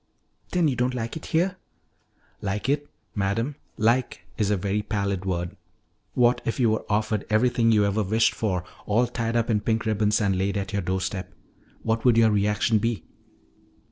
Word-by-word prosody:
"Then 175 -3 +3
you 135 - +1
don't 125 +2 0
like 115 -2 -3
it 160 - -7
here?" 180 +4 +1 0.8
"Like 105 +3 -2
it? 145 +1 0 0.2
Madam, 105 +7 -1 0.2
'like' 115 +3 +1
is 105 -3 0
a 105 - +2
very 100 +3 -1
pallid 100 -3 -2
word. 85 -2 -2 0.6
What 120 0 +4
if 115 - -2
you 115 -3 +4
were 110 - 0
offered 105 0 +1
everything 115 +1 +3
you 105 -2 +4
ever 100 +2 +1
wished 110 +3 +2
for, 95 -5 -1 0.2
all 115 +4 +3
tied 115 -1 -2
up 115 0 +1
in 105 - +3
pink 110 +1 0
ribbons 105 -1 +2
and 100 -3 +1
laid 100 +2 0
on 100 - -1
your 100 - 0
door 95 +1 -1
step? 95 -1 -4 0.5
What 115 0 0
would 120 -3 +5
your 110 -1 +5
reaction 105 +2 +2
be?" 115 0 -1
110 Hz, 180 wpm, -25 LUFS, 100-120 Hz, 0.8 s, would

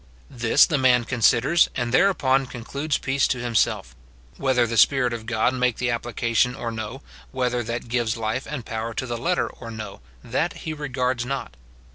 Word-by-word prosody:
This 120 -1 +4
the 150 -4 0
man 125 -2 +4
considers, 125 +6 +3
and 120 -1 -2
thereupon 135 -7 +3
concludes 140 +5 -3
peace 135 0 +1
to 130 - -1
himself; 115 - 0 0.4
whether 130 -3 +2
the 115 0 -3
Spirit 125 +1 +4
of 110 -1 -6
God 120 +2 +1
make 125 -2 0
the 125 -1 0
application 120 +1 0
or 120 -3 -4
no, 115 +4 -6 0.3
whether 125 -2 -1
that 120 +1 -4
gives 120 -1 -1
life 115 +4 -2
and 145 -6 -5
power 115 0 -4
to 130 - -2
the 120 -2 -4
letter 175 +5 0
or 115 - -10
no, 110 -3 -8 0.2
that 160 +8 -1
he 155 - -2
regards 130 -4 -2
not. 130 - -5
125 Hz, 175 wpm, -24 LUFS, 115-130 Hz, 0.4 s, This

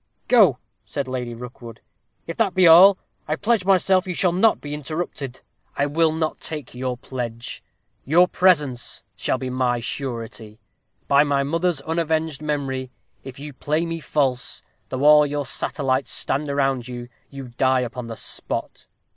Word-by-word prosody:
"Go," 200 - +5 0.3
said 140 -2 -4
Lady 125 -2 -4
Rookwood; 120 -1 -10 0.5
"if 165 - -6
that 205 -6 +1
be 185 -1 +5
all, 180 +4 +8 0.3
I 155 - 0
pledge 215 +1 +1
myself 190 0 +3
you 180 - -3
shall 180 0 +2
not 195 +6 +3
be 145 0 -7
interrupted." 150 -3 -5 0.4
"I 140 - +2
will 160 +2 +2
not 160 0 -2
take 150 -5 -5
your 125 0 -3
pledge; 120 -2 -6 0.4
your 175 +6 +4
presence 150 -11 +1
shall - - -1
be 130 0 -5
my 125 -1 0
surety. 115 -4 -6 0.5
By 140 +1 +5
my 140 -1 +1
mother's 165 +1 0
unavenged 160 -1 -1
memory, 135 -4 -3 0.3
if 135 -1 -9
you 145 +1 -8
play 155 +5 -1
me 165 0 -4
false, 135 -5 -1 0.3
though 130 +1 -3
all 150 0 +7
your 145 0 -3
satellites 130 +1 -1
stand 145 +2 0
around 135 -3 0
you, 120 -1 -7 0.2
you 135 -2 -9
die 130 +1 +2
upon 125 0 -5
the 115 - -7
spot! - - -3
140 Hz, 155 wpm, -22 LUFS, 130-165 Hz, 0.5 s, all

